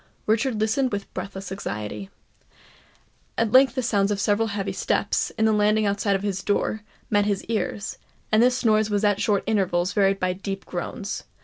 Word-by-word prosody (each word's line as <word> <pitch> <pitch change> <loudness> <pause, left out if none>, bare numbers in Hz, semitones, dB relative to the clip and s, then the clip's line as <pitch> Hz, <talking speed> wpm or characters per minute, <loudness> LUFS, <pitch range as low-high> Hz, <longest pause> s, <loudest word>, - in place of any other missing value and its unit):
Richard 225 +1 +1
listened 235 +5 +1
with 200 -1 -5
breathless 190 0 -6
anxiety. 105 - -5 1.3
At 230 -2 +1
length 260 0 +6
the 255 - -1
sounds 205 -4 +2
of 205 -1 -1
several 210 +2 +2
heavy 200 -2 -3
steps, - - 0
in 220 - +2
the 220 - +4
landing 210 +1 +3
outside 200 -1 +1
his 195 -2 -2
door, 210 +2 0 0.3
met 205 -1 +3
his 200 -2 -1
ears; 210 -1 -3 0.3
and 215 +1 +5
this 250 +1 +2
noise 215 -1 +3
was 205 0 0
at 205 -1 +2
short 205 -2 +1
intervals 190 -4 +1
varied 195 -1 +2
by 185 0 0
deep 195 +1 -6
groans. 195 +4 -5
205 Hz, 175 wpm, -24 LUFS, 195-220 Hz, 1.3 s, length